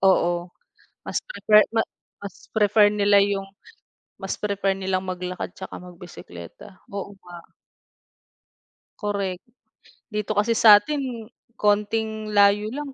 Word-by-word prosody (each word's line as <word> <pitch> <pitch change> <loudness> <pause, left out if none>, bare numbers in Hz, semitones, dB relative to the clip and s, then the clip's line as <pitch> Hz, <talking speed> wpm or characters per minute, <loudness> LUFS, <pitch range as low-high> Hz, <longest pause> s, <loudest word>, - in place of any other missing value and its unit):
oo. 175 -2 +2 0.6
Mas - - -2
prefer 215 - +4
ma 225 -1 0 0.3
mas 200 -2 -11
prefer 210 -1 +4
nila 205 -1 +4
yung 200 -1 0 0.8
mas 195 -1 -4
prefer 200 -2 -1
nilang 190 -1 -1
maglakad 180 0 -4
tsaka 190 - -8
magbisekleta. 175 - -12 0.2
Oo 200 0 -6
nga. 175 -1 -11 1.5
Korek. 200 -4 -3 0.7
Dito 210 0 -2
kasi 220 +3 +2
sa 220 -2 +8
atin 285 +8 -3 0.6
konting 215 +1 0
layo 205 +1 +4
lang, 290 -1 -6
200 Hz, 110 wpm, -23 LUFS, 190-210 Hz, 1.5 s, sa